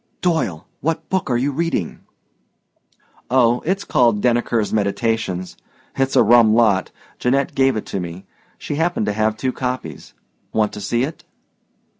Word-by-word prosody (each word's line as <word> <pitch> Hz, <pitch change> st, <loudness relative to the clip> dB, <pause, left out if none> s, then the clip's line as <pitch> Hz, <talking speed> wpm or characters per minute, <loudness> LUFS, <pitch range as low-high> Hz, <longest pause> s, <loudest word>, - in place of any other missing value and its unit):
"Doyle, 160 Hz, -, 0 dB
what 160 Hz, +2 st, -2 dB
book 190 Hz, -5 st, -1 dB
are 120 Hz, -, +2 dB
you 135 Hz, +4 st, 0 dB
reading?" 150 Hz, -, -2 dB, 1.3 s
"Oh, 120 Hz, -1 st, +3 dB
it's 195 Hz, +2 st, 0 dB
called 120 Hz, -4 st, +2 dB
'Denneker's 120 Hz, -2 st, +1 dB
Meditations.' 105 Hz, -2 st, -1 dB, 0.4 s
It's 135 Hz, 0 st, 0 dB
a -, -, +6 dB
rum 115 Hz, -1 st, +5 dB
lot, 105 Hz, -5 st, +3 dB, 0.3 s
Janette 135 Hz, +3 st, +1 dB
gave 135 Hz, -2 st, +3 dB
it 110 Hz, -, -4 dB
to 100 Hz, -, -4 dB
me; 90 Hz, +1 st, -7 dB, 0.3 s
she 145 Hz, -, -5 dB
happened 165 Hz, -7 st, 0 dB
to 105 Hz, -, -1 dB
have 110 Hz, +1 st, 0 dB
two 130 Hz, +2 st, -1 dB
copies. 125 Hz, 0 st, -5 dB, 0.4 s
Want 110 Hz, -1 st, +1 dB
to 105 Hz, -, -7 dB
see 120 Hz, +4 st, 0 dB
it?" 155 Hz, +4 st, -5 dB
120 Hz, 150 wpm, -20 LUFS, 105-135 Hz, 1.3 s, a